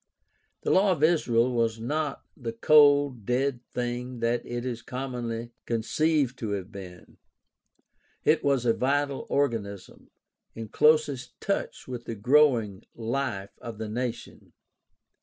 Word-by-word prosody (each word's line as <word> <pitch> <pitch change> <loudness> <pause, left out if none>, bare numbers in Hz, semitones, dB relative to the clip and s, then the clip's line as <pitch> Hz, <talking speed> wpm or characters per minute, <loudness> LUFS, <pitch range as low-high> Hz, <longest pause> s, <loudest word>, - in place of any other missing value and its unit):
The - - +1
law 195 +1 +4
of 155 -3 -3
Israel 125 -7 +3
was 115 -1 0
not 145 +4 -2
the 115 -4 -5
cold, 145 -1 +5
dead 125 +3 0
thing 125 +1 -3
that 115 +1 0
it 120 0 -5
is 120 -2 -3
so 120 - -20
commonly 120 -3 -4 0.2
conceived 130 +4 +1
to 105 -3 -2
have 95 0 -5
been; 90 -3 -11 1.1
it 155 0 +3
was 140 -3 +2
a 115 - +4
vital 140 +2 0
organism, 105 -9 -2 0.5
in 115 -1 -7
closest 150 -4 +2
touch 200 - -3
with 125 -2 -6
the 115 - -5
growing 120 -4 +3
life 115 -4 -3
of 115 -3 -7
the 110 -1 -5
nation. 120 +2 -5
125 Hz, 135 wpm, -27 LUFS, 115-140 Hz, 1.1 s, cold